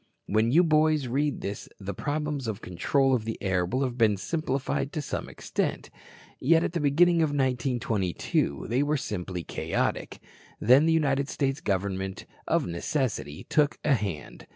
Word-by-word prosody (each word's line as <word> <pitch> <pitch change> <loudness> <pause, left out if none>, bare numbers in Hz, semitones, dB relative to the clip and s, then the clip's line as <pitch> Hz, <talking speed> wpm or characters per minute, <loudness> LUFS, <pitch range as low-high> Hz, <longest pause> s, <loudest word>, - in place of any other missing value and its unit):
When 110 +3 +2
you 170 +6 +6
boys 155 -3 +3
read 140 +4 -1
this 100 +1 -5
the 100 0 -5
problems 145 +2 -2
of 110 -2 -3
control 130 +9 +1
of 120 -4 +1
the 110 0 -4
air 95 -3 0
will 130 +9 0
have 125 -2 -3
been 110 -3 +4
simplified 140 - -2
to - - -2
some - - -4
extent. - - -3 0.5
Yet 165 +4 +4
at - - -2
the 170 - 0
beginning 165 +4 +4
of 160 -2 +3
1922 125 - 0
they 120 +4 +1
were 150 +1 +1
simply 90 -7 -4
chaotic. - - -2 0.4
Then 130 +8 +5
the - - +4
United 140 -3 +1
States 135 -1 -1
Government 95 -1 -2 0.2
of - - +2
necessity 85 - -2
took 150 -2 +2
a 150 - +4
hand. 100 - -4
130 Hz, 160 wpm, -27 LUFS, 100-150 Hz, 0.5 s, you